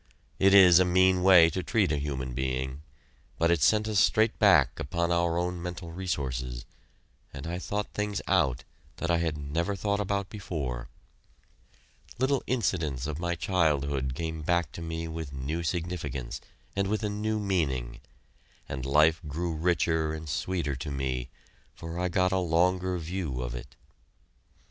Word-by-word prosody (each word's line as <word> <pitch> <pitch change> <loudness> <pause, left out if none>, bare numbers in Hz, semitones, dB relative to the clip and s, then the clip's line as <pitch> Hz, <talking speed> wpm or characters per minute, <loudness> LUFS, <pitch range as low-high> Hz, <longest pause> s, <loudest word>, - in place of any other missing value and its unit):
It 95 +1 +5
is 90 -3 +8
a - - +6
mean 95 +1 +3
way 90 -3 +7
to 95 - -2
treat 105 -1 +1
a 75 - +1
human 65 -3 -3
being, 65 +2 -2 0.6
but 85 +1 +3
it 85 -3 +2
sent 110 +7 +3
us 105 -2 +2
straight 110 +4 +3
back - - +5
upon 85 +5 -1
our 85 -1 +1
own 90 0 -2
mental 90 -1 -6
resources, 65 -9 -3 0.7
and 70 0 -8
I 85 +2 -3
thought 105 +2 -3
things 105 -1 -2
out 65 -1 +1 0.3
that 85 - -2
I 85 - +3
had 80 -2 -1
never 80 +7 -2
thought 100 +2 -1
about 100 -1 -1
before. 70 - -5 1.3
Little 130 +1 +1
incidents 80 - -1
of 75 +1 -4
my 85 0 -1
childhood 70 -7 0
came 80 0 -4
back 85 -1 0
to 85 - -8
me 80 0 -4
with 80 -3 -6
new 70 +5 -3
significance 80 -8 -3 0.3
and 100 0 0
with 110 +2 -1
a - - +1
new 110 +1 -1
meaning, 70 - -1 0.7
and 65 -1 -5
life 75 +3 +4
grew 85 +4 -2
richer 80 -1 +1
and 80 0 -7
sweeter 75 0 -2
to 70 +3 -5
me, 65 -2 -3 0.5
for 85 +1 -6
I 90 - +1
got 90 +1 +2
a 95 - +2
longer 90 +2 +1
view 85 -5 -4
of - - -3
it. - - -8
85 Hz, 160 wpm, -28 LUFS, 70-95 Hz, 1.3 s, is